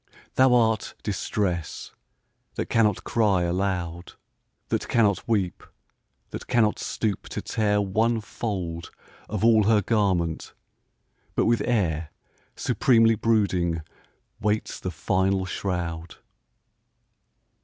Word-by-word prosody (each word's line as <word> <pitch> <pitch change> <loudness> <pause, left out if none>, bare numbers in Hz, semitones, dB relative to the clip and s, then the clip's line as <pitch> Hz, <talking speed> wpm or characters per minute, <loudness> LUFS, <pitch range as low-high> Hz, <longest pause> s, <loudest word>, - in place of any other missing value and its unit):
Thou 130 -1 +5
art 110 -3 +1
Distress 95 -4 -2 0.3
— - - -46
^that - - -3
cannot 105 -4 +2
cry 105 -6 +2
alou<^ 85 -1 -2 0.5
That - - -1
cannot 105 -5 +2
weep, 100 -6 0 0.7
that - - -7
cannot 115 -4 +2
stoop 105 -4 -3
to - - -4
tear 105 -2 +1
One 110 +4 +1
fold 95 -6 -4 0.4
of 105 +1 -1
all 110 -3 +5
her 105 -1 +4
garment, 95 -7 0 0.8
but - - +2
with 115 0 +2
air 85 -10 0 0.5
Supremely 115 -3 +3
brooding 95 -7 +1 0.6
waits 105 0 -1
the 90 - -4
final 95 +3 0
shroud 85 -3 -4
100 Hz, 105 wpm, -25 LUFS, 90-110 Hz, 0.8 s, Thou